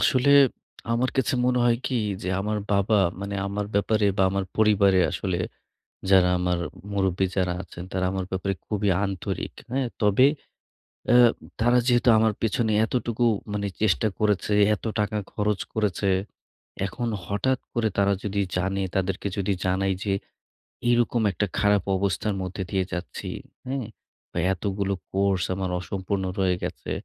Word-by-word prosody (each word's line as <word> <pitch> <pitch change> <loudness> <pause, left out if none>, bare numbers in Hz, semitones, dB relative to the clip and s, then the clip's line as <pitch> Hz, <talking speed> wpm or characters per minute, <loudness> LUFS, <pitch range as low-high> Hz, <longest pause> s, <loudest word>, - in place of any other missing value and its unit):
আসলে 130 +2 +3 0.6
আমার 125 +2 +1
কাছে 130 -1 +1
মনে 125 0 +2
হয় 120 -1 +4
কী 130 - -1 0.3
যে 90 - -3
আমার 105 +2 -1
বাবা, 100 +2 +3 0.2
মানে 100 0 -4
আমার 100 +1 -3
ব্যাপারে 105 +1 +2
বা - - +3
আমার 100 0 -1
পরিবারে 100 -3 +4
আসলে 95 -3 -2 0.7
যারা 95 -2 +6
আমার 90 0 +1 0.4
মুরুব্বি 95 -1 +1
যারা 90 -2 +1
আছেন, 85 - -9
তারা 95 0 0
আমার 95 -1 -2
ব্যাপারে 95 +1 -1
খুবই 105 -1 0 0.2
আন্তরিক। 95 -2 -4 0.2
হ্যাঁ, 130 -1 0
তবে 105 +5 +5 0.8
অ্যা 120 +1 +7 0.4
তারা 120 +1 +4
যেহেতু 120 0 +4
আমার 110 -1 +3
পেছনে 110 0 +1
এতটুকু 120 0 -1 0.3
মানে 100 -1 -1
চেষ্টা 110 +1 +2
করেছে, 105 -1 +1 0.2
এত - - -12
টাকা 105 0 0 0.2
খরচ 105 -1 0
করেছে, 105 -2 0 0.8
এখন 120 +5 -3 0.2
হঠাৎ 105 +8 0
করে 115 -2 +1
তারা 100 0 +3
যদি 100 0 -1 0.2
জানে, 95 +2 0
তাদেরকে 95 +1 -1
যদি 100 0 0
জানাই 95 +1 +1
যে 100 - 0 0.7
এই 120 - +5
রকম 120 0 +1
একটা 105 - -1
খারাপ 105 -2 +3
অবস্থার 100 +2 -1
মধ্যে 95 +1 -4
দিয়ে 95 -1 +1
যাচ্ছি। 90 0 -5 0.4
হুম? 130 0 -2 0.5
বা - - -7 0.2
এতগুলো 100 +1 -2 0.2
কোর্স 95 -2 +1
আমার 95 -1 -2
অসম্পূর্ণ 95 +1 -3 0.2
হয়ে 95 -2 +2
গেছে। - - -5
100 Hz, 150 wpm, -25 LUFS, 95-110 Hz, 0.8 s, অ্যা